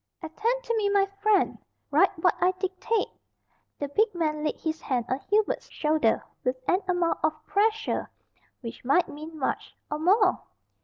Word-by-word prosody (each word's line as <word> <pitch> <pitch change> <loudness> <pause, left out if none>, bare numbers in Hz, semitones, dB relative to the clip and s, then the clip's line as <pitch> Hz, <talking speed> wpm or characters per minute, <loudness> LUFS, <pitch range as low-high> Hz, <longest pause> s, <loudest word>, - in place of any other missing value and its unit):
"Attend 455 +10 -1
to 465 - -1
me, 410 -2 +2
my 400 -1 +4 0.2
friend 420 -2 +3 0.3
write - - +5
what 345 +2 +3
I 365 +1 +4
dictate." 380 +4 -1 0.7
The 285 - -3
big 420 +6 +2
man 305 -3 -1
laid 305 - -1
his 315 0 -3
hand 245 -4 -1
on 260 - 0
Hubert's 425 +1 +1
shoulder 300 -7 +1 0.2
with 255 +1 +1
an 370 - +3
amount 355 -2 +1
of 315 0 +3
pressure 440 +2 +1 0.5
which 230 -2 -8
might 280 +8 +3
mean 310 +2 -8
much 275 - -3 0.2
or 300 - -1
more! 375 +3 +4
355 Hz, 160 wpm, -27 LUFS, 305-410 Hz, 0.7 s, write